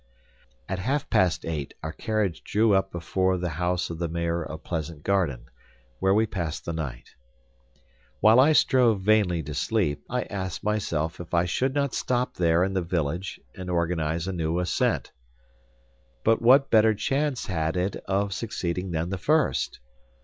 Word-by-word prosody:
At 95 0 -3
half 135 +8 -1
past 90 -3 +2
eight 75 -4 -4
our 80 - -3
carriage 105 -6 -2
drew 105 +1 +2
up 95 0 +2
before 95 +2 0
the 90 -1 -2
house 90 0 0
of 80 - -6
the 85 - -1
Mayor 85 +1 -1
of 80 0 -8
Pleasant 80 -2 -4
Garden, 85 -12 0 0.5
where 95 +1 +3
we 110 +1 +4
passed 85 -7 -4
the 85 - -3
night. 70 -7 -6 1.1
While 110 +3 +6
I 145 +4 +6
strove 120 -8 +4
vainly 95 -5 +2
to 75 +1 -6
sleep, 75 +1 0
I 125 0 -1
asked 95 -4 -5
myself 85 -6 -1
if 85 0 -4
I 85 +1 +3
should 130 +10 0
not 140 -3 0
stop 125 0 -1
there 85 0 +2
in 95 +1 -1
the 95 - +1
village 85 +1 -2
and 90 -1 -7
organize 85 -1 -1
a 95 - -2
new 85 -1 -1
ascent. 90 -1 0 1.1
But 115 - +3
what 135 +4 +5
better 110 -1 +5
chance 135 +4 -1
had 80 -2 -1
it 95 +2 0
of 100 +1 0
succeeding 90 -4 -3
than 85 +1 -2
the 95 - -3
first? 155 +9 +1
90 Hz, 165 wpm, -26 LUFS, 85-110 Hz, 1.1 s, While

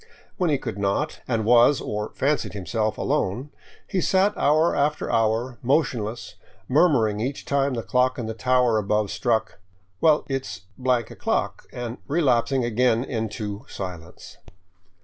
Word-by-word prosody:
When 180 -3 +1
he 145 - +2
could 115 -6 -6
not, 100 +11 -1
and 115 -3 0
was, 120 +4 +5
or 105 +1 -4
fancied 145 +2 0
himself, 110 +2 -2
alone, 125 +10 -1 0.4
he 185 - -1
sat 195 +3 +2
hour 155 +4 +3
after 150 +1 0
hour 115 +2 0
motionless, 120 -5 -1 0.3
murmuring 125 -9 +3
each 130 +5 -3
time 140 -1 +1
the 115 - -3
clock 130 +3 +1
in 120 - -3
the 110 - -4
tower 125 -1 +2
above 105 0 0
struck, 110 +2 -1 0.2
" 95 0 -41
Well, 155 -2 +4
it 135 -1 -2
's 95 -2 -8 0.2
o'clock," 125 -3 -1
and 120 -1 -6
relapsing 135 -4 +2
again 120 0 +2
into 110 -3 -4
silence. 90 -3 -8
120 Hz, 145 wpm, -24 LUFS, 110-140 Hz, 0.4 s, was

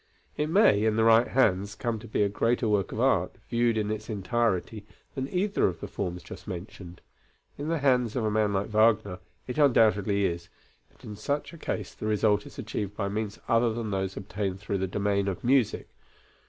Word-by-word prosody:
It 150 - -1
may, 165 - +4
in 110 -1 +2
the 110 - +2
right 115 +1 +5
hands, 100 -5 +1
come 115 -1 -2
to 120 - -11
be 105 - +1
a - - +3
greater 115 +3 0
work 105 -3 +1
of - - -5
art, - - +2 0.2
viewed 120 -1 +2
in 105 -1 -1
its 110 +1 -5
entirety, 110 0 -1 0.3
than 130 0 -3
either 200 +3 +1
of 90 -2 -4
the - - -6
forms 90 -3 -4
just - - -11
mentioned. 90 -1 -8 0.5
In 145 - -5
the 165 +1 0
hands 125 -5 +2
of 120 -4 0
a 105 - +1
man 105 -1 +2
like 100 0 0
Wagner, 105 -4 +2 0.3
it 125 +4 -4
undoubtedly 105 -7 +3
is, 85 -1 -3 0.4
but - - -25
in 105 - -7
such 145 +10 -3
a - - -10
case - - -4
the 110 - -5
result 105 +3 +2
is - - -14
achieved 105 -5 -4
by 100 -2 -1
means 105 0 -3
other 115 0 +3
than 115 -3 -3
those 95 -1 -2
obtained 95 -1 -4
through 100 -1 -3
the 95 - -1
domain 100 +1 0
of 95 -2 -3
music. 125 -2 +2
105 Hz, 205 wpm, -27 LUFS, 100-120 Hz, 0.5 s, right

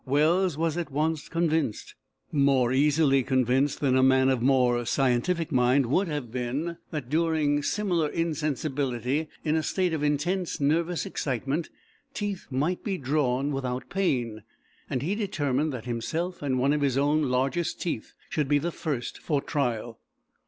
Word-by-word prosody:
Wells 155 +5 +2
was 165 0 0
at 170 -2 -3
once 155 +2 -1
convinced 160 -8 -1 0.4
more 135 -4 +3
easily 140 0 +4
convinced 130 +2 +1
than 135 -3 +3
a 130 - +4
man 130 0 +5
of 130 -3 +1
more 125 -2 +3
scientific 140 +8 +1
mind 130 +1 +3
would 180 +11 +1
have 145 -7 -4
been 130 +8 -3
that, 150 -6 -5
during 155 -1 +1
similar 175 -3 0
insensibility, 145 -4 -1 0.2
in 155 -1 +1
a 160 - +2
state 180 +1 0
of 155 - -1
intense 160 +5 0
nervous 165 +4 +1
excitement, 135 +4 -2 0.5
teeth 205 -3 -3
might 145 +7 -1
be 195 -3 -2
drawn 140 -1 0
without 130 -2 -3
pain, 125 - 0 0.5
and 130 - -2
he 175 +7 0
determined 155 - -1
that 125 -4 -6
himself 160 +10 -3
and 135 -3 0
one 135 +3 +2
of 150 - 0
his 135 -2 +1
own 145 0 +2
largest 135 +7 0
teeth 160 -10 -4
should 150 -3 -1
be 145 +1 +3
the 170 +4 -1
first 145 -8 -4
for 145 -3 0
trial. 120 -6 -2
145 Hz, 155 wpm, -27 LUFS, 130-160 Hz, 0.5 s, man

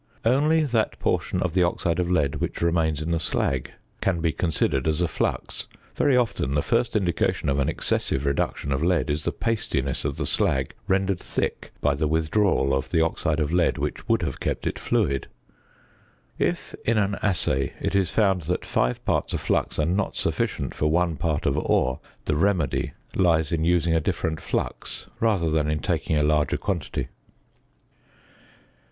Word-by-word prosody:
Only 150 +7 +4
that 115 -6 0
portion 90 - 0
of 90 -3 -1
the 90 - +3
oxide 85 -1 +1
of 90 -1 0
lead 75 -5 +1
which 75 - -3
remains 80 -3 +1
in 80 - -3
the 85 - +1
slag 65 -5 -1 0.3
can 95 -3 +1
be 80 0 +1
considered 80 -4 0
as 80 0 +1
a 90 - +2
flux; - - -2 0.3
very 135 -3 +3
often 110 - 0
the 75 - +2
first 115 +4 +1
indication 90 -8 +1
of 70 +1 +1
an 70 - +1
excessive 65 - 0
reduction 70 0 -1
of 70 +3 0
lead 85 -3 +2
is 75 +1 -2
the - - +1
pastiness 110 - -1
of - - -2
the - - -1
slag 65 -1 +1
rendered 95 -1 +1
thick - - -3
by 75 - +3
the 75 +2 0
withdrawal 80 -2 +2
of 65 0 -1
the 85 - +2
oxide 80 -1 +1
of 75 +1 0
lead 85 -1 +2
which - - -4
would - - +3
have - - -3
kept - - -2
it - - -2
fluid. 70 0 0 1.1
If, - - -1
in 115 0 +2
an 100 -1 +1
assay, 70 -9 0
it - - -2
is 95 -3 +2
found 95 -3 +2
that 90 - -1
5 - - 0
parts - - 0
of - - 0
flux - - 0
are 75 - +2
not 90 +5 0
sufficient - - -1
for 75 - 0
1 85 0 +1
part 80 -4 -1
of - - +2
ore, 65 0 +1 0.3
the 75 - +1
remedy 85 -4 +1 0.2
lies 80 -5 +3
in 80 -2 0
using 85 -1 +3
a 80 - +3
different 80 +1 -2
flux - - -3
rather 100 -8 +2
than 75 -1 +1
in 75 - +1
taking 75 - 0
a 75 - +2
larger 75 0 +2
quantity. 95 -6 -3
80 Hz, 180 wpm, -25 LUFS, 75-95 Hz, 1.1 s, Only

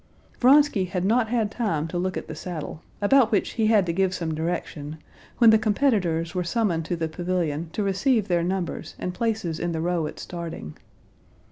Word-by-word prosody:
Vronsky 270 -6 +5
had 180 0 -2
not 225 +3 +3
had 225 -3 0
time 165 -11 -1
to 175 - -2
look 185 +1 -2
at - - -6
the - - -6
saddle, 165 -2 -6 0.2
about 250 +2 +5
which 205 - +1
he 220 -2 +1
had 215 -4 +4
to 170 - -1
give 190 +1 +1
some 165 -2 -3
direction, 155 -2 -4 0.4
when 230 -2 +7
the 220 - +5
competitors 200 - +1
were 180 -1 -1
summoned 170 -4 0
to 175 - -2
the 165 -1 -2
pavilion 170 -2 -2
to 210 - -1
receive 210 +3 +1
their 175 -2 +2
numbers 175 -2 -3
and 180 - -4
places 220 -7 -2
in 175 -1 -2
the 160 - -2
row 170 -1 0
at - - -9
starting. 165 - -7
180 Hz, 195 wpm, -25 LUFS, 165-220 Hz, 0.4 s, when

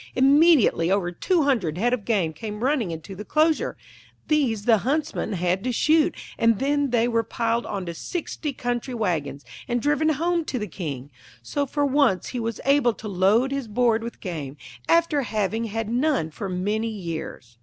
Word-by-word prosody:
Immediately 275 - +5
over 190 -2 +1
two 330 - +1
hundred 210 - 0
head 240 +6 +1
of 225 -5 -2
game 190 -9 +1
came 210 +7 -6
running 260 -7 +1
into 165 +4 -7
the 195 - -8
enclosure; 310 +7 +1 0.5
these 250 -9 +1
the 225 -3 +5
Huntsmen 295 -3 -1
had 180 +1 0
to 255 - -1
shoot, 310 +6 +3 0.2
and 230 -2 +4
then 285 +2 +1
they 235 -1 +2
were 230 -1 +2
piled 230 +1 -1
on 195 -2 -4
to 170 - -5
sixty 310 - -4
country 245 -1 -3
wagons, 150 - -2 0.2
and 240 0 0
driven 295 +4 +1
home 335 +3 +1
to 260 - -3
the 210 - -2
King. 145 -8 -6 0.3
So 280 - -2
for 290 +2 0
once 270 - +2
he 250 - -4
was 230 -1 -3
able 275 -4 +3
to 215 - -8
load 205 +7 +2
his 275 -3 -3
board 230 +1 +2
with 235 +1 -7
game, 150 -7 -5 0.3
after 330 -3 +3
having 220 -1 -1
had 225 0 -3
none 245 - 0
for 195 +5 -5
many 205 +5 -1
years. 165 - -7
230 Hz, 180 wpm, -24 LUFS, 190-275 Hz, 0.5 s, Immediately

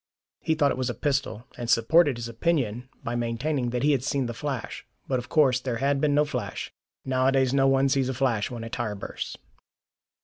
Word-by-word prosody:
He 160 - 0
thought 145 -3 +3
it - - -3
was 130 -1 0
a 120 - -3
pistol, 140 -5 -1
and 120 -1 -4
supported 135 +4 +4
his 120 -1 -5
opinion 125 -2 -1
by 115 - -3
maintaining 120 +3 -1
that 125 +1 -2
he 150 - +4
had 135 -3 +1
seen 135 -1 0
the 120 - -3
flash. 135 0 -4 0.2
But 130 -2 0
of 125 - -9
course 135 -5 +4
there 125 -2 -3
had 140 +2 +1
been 145 -2 +2
no 150 +1 +4
flash. 125 -9 -5 0.3
Nowadays 130 0 +2
no 135 -1 +4
one 135 0 +4
sees 135 -1 +1
a 130 - -2
flash 120 -5 0
when 120 -3 -6
a 115 - -6
tyre 115 -4 -2
bursts. 100 - -6
130 Hz, 210 wpm, -26 LUFS, 120-140 Hz, 0.3 s, supported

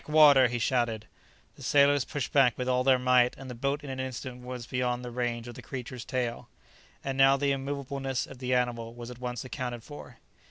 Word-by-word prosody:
"Backwater!" 150 -4 +6
he 120 0 -2
shouted. 120 -2 0 0.5
The - - -14
sailors 140 0 +4
pushed 145 -5 -4
back 135 -4 +4
with 125 - -3
all 125 0 +2
their 130 0 +5
might, 125 -1 +3
and 130 -1 -8
the - - -5
boat 140 +4 -2
in 140 - -6
an 130 - -5
instant 130 -1 -5
was 125 -1 -6
beyond 125 0 -1
the 120 - -6
range 120 -1 -2
of 120 - -7
the - - -10
creature's 125 -2 -7
tail. 125 -2 -3 0.5
And 135 0 -3
now 135 0 +6
the 140 0 +1
immoveableness 135 -1 -3
of 130 - -12
the 130 -1 0
animal 120 -2 -1
was 120 0 -8
at 125 - -11
once 125 0 -4
accounted 125 -2 -5
for. 130 -4 -11
125 Hz, 210 wpm, -29 LUFS, 120-135 Hz, 0.5 s, Backwater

